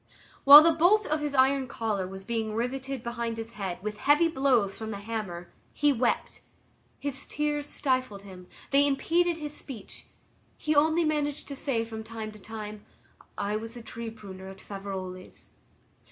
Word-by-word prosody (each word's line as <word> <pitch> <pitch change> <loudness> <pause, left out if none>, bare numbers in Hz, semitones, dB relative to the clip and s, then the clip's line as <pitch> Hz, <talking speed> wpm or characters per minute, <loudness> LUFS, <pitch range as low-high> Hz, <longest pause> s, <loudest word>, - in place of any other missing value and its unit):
While 290 +2 +12
the 335 - +5
bolt 370 +7 +4
of 310 +1 0
his 295 -1 -3
iron 265 0 +3
collar 215 -5 -2
was 190 +1 -9
being 220 0 -2
riveted 260 +2 -3
behind 235 -1 -3
his 225 0 -6
head 195 -5 -4
with 210 0 -4
heavy 295 +4 +4
blows 260 -10 +2
from 220 -1 -6
the 205 - -4
hammer, 200 -5 -5 0.2
he 290 0 +3
wept, 245 -1 -1 0.6
his 275 -1 -4
tears 295 -1 -1
stifled 255 -9 -1
him, 185 -2 -12 0.2
they 280 +1 +5
impeded 335 +5 +1
his 300 -2 -5
speech; 240 -8 -8 0.5
he 305 0 0
only 315 +3 +4
managed 295 -1 -1
to 280 - -5
say 255 -5 -1
from 220 -1 -7
time 220 -1 -6
to 215 - -14
time, 215 0 -8 0.5
"I 205 +1 -1
was 225 +2 -7
a 235 - -9
tree 230 0 -6
pruner 190 -4 -10
at 190 0 -9
Faverolles." 190 -2 -7
235 Hz, 170 wpm, -28 LUFS, 210-285 Hz, 0.6 s, While